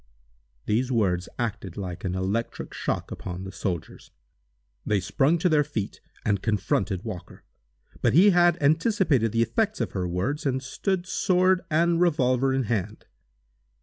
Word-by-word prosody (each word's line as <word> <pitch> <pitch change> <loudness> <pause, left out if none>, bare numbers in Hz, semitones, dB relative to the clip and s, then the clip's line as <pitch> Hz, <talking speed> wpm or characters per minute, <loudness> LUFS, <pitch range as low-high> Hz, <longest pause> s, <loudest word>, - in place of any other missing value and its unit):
These 125 +5 0
words 95 -7 +1
acted 110 -6 -4
like 90 -4 -5
an 95 -2 -2
electric 100 +5 -3
shock - - -3
upon 90 0 -6
the 95 - -7
soldiers. 90 -4 -5 0.7
They 105 -1 +1
sprung 140 - +2
to 180 +2 +1
their 155 -3 +4
feet 125 -9 -5 0.2
and 100 -3 +1
confronted 105 -2 0
Walker. 90 -6 -8 0.6
But - - +2
he 190 +7 +7
had 175 -1 +4
anticipated 155 - +2
the 115 +1 +2
effects 215 - -1
of - - -2
her 90 -2 -2
words, 95 - -2
and 130 0 -1
stood 180 +7 -2
sword 185 0 +2
and 170 +2 +2
revolver 135 -6 +2
in 135 0 +1
hand. 105 -2 -3
125 Hz, 150 wpm, -26 LUFS, 100-165 Hz, 0.7 s, he